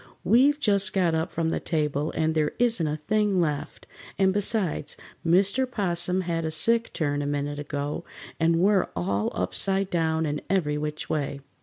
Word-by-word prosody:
We've 270 - +4
just 200 -6 +3
got 180 -4 +2
up 160 0 0
from 165 -1 -1
the - - -1
table 150 -2 -1
and 160 0 0
there 155 -2 0
isn't 230 -9 +2
a 150 +1 -2
thing 205 +4 +1
left, 150 -4 -2 0.3
and 190 -1 +3
besides, 205 -3 -1 0.3
Mr. 200 +9 +2
'Possum 180 -4 0
had 170 -2 -2
a 160 - -1
sick 230 +9 +1
turn 145 -3 -1
a 145 - -2
minute 145 0 -2
ago, 145 +2 -4 0.4
and 165 0 +3
we're 190 +3 +3
all 100 +4 -1
upside 180 - 0
down 160 -1 +1
and 150 -1 -2
every 150 -6 +1
which 150 0 -4
way." 140 -2 -2
165 Hz, 170 wpm, -26 LUFS, 150-195 Hz, 0.4 s, We've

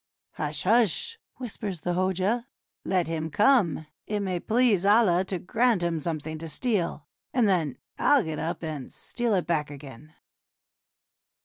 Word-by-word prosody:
"Hush, 150 0 -3
hush!" 235 - +2 0.2
whispers 205 -8 -5
the 175 - -1
Hoja. 190 +7 0 0.4
"Let 180 -2 +1
him 160 -1 -3
come; 205 - +3 0.2
it 210 -1 -1
may 185 -3 -1
please 225 -2 +2
Allah 200 -3 +4
to 190 0 -2
grant 225 +2 +1
him 170 -2 0
some 160 0 -2
thing 155 +1 -6
to 165 0 -7
steal, 175 - -1 0.3
and 240 -4 +4
then 165 -8 +1 0.2
I'll 285 -5 +4
get 160 -3 -4
up 165 +1 -3
and 155 -5 -5
steal 240 -3 -2
it 180 - 0
back 150 -4 0
again." 145 +1 -11
180 Hz, 150 wpm, -27 LUFS, 160-220 Hz, 0.4 s, Allah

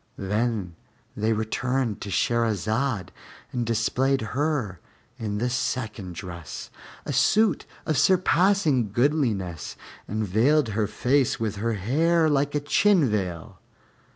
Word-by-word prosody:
Then 105 -2 -1 0.4
they 110 +2 0
returned 115 +2 -1
to 100 - -5
Shahrazad 110 0 0 0.4
and 125 - -1
displayed 130 +4 +1
her 130 - -1 0.4
in 105 -3 -3
the 120 +4 0
second 110 -7 -3
dress, 85 -3 -8 0.3
a - - -3
suit 215 -7 +3 0.2
of 155 -5 +1
surpassing 180 - +3
goodliness, 115 - 0 0.3
and 110 +1 -2
veiled 125 +7 +3
her 105 0 0
face 130 +4 +1
with 110 -2 -2
her 115 +3 -1
hair 160 - +2
like 145 +1 +1
a - - +2
chin 150 - +3
veil. 90 -6 -3
115 Hz, 120 wpm, -25 LUFS, 105-145 Hz, 0.4 s, suit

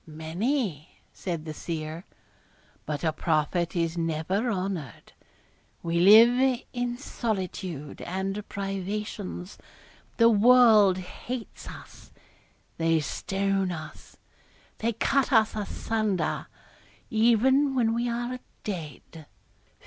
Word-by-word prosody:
'Many,' 165 - -3
said 170 -4 -4
the 155 - -5
seer; 160 +1 -5 0.8
'but 145 -1 -3
a 160 -1 +1
prophet 165 +3 0
is 170 0 -1
never 165 +8 -1
honoured. 185 - -4 0.7
We 170 0 0
live 240 +6 +6
in 245 -1 -2
solitude 185 - -4
and 195 +3 -4
privations 195 -1 -5 0.6
the 230 - +6
world 220 -3 +6
hates 230 +6 -7
us - - -12 0.7
they 165 0 +3
stone 195 +5 -1
us 155 -2 -9 0.6
they 230 +1 0
cut 275 +5 +1
us 225 -3 +4
asunder, 210 -2 -2 0.6
even 255 +5 +3
when 230 -3 +2
we 240 +1 0
are 240 +2 -3 0.2
dead. 160 -4 -7
195 Hz, 95 wpm, -27 LUFS, 165-230 Hz, 0.8 s, live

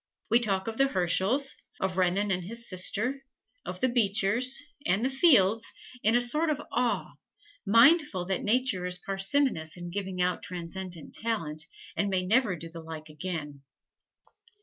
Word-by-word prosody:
We 235 - +6
talk 195 -4 0
of 225 +2 -4
the 275 - +5
Herschels, 195 +7 +1 0.2
of 190 -1 -1
Renan 190 +3 +1
and 180 -1 0
his 230 +5 -6
sister, 230 +9 -1 0.4
of - - -7
the 255 - +4
Beechers, 240 +3 +2 0.2
and 200 +3 +1
the 265 - 0
Fields, 230 - +4 0.3
in 220 +3 +3
a 245 - +4
sort 305 +7 +1
of 300 -2 0
awe, 245 0 -1 0.5
mindful 230 - +5
that 190 0 -1
Nature 220 -5 +1
is 180 0 -2
parsimonious 195 - 0
in 175 0 -7
giving 190 -1 -4
out 180 0 0
transcendent 180 -1 -7
talent, 165 -9 -3 0.3
and 200 - 0
may 185 -1 0
never 220 -1 +2
do 165 0 -8
the 165 0 -10
like 160 -1 -9
again. 150 -3 -6
195 Hz, 155 wpm, -28 LUFS, 180-240 Hz, 0.5 s, We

